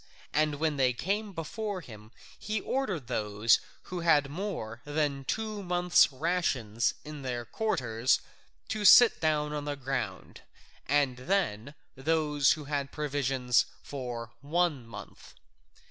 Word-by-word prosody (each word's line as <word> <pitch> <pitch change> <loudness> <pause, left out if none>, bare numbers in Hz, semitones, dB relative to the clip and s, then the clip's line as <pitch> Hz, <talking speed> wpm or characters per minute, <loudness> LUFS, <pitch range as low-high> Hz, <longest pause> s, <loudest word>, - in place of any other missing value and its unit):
And 155 -1 +2
when 155 0 -1
they 130 -2 +3
came 200 - -2
before 195 +4 -4
him 110 -7 -12 0.3
he 215 +1 -2
ordered 200 - -2
those 110 -2 +2 0.2
who 180 - -5
had 150 -5 +3
more 150 - -5
than 145 -2 -1
two 215 +2 -2
months' 180 -3 +4
rations 130 -8 0
in 150 -1 -7
their 125 -3 -3
quarters 120 - 0 0.5
to 215 -1 -2
sit 240 +3 +8
down 150 -2 +1
on 145 -1 -3
the 145 -1 -2
ground, 135 0 -4 0.5
and 140 -2 +2
then 140 - -1 0.2
those 150 0 +2
who 155 - -7
had 140 -1 -3
provisions 135 -4 +1 0.2
for 120 -4 -6
one 150 -4 0
month. 115 - -11
145 Hz, 130 wpm, -29 LUFS, 125-175 Hz, 0.5 s, sit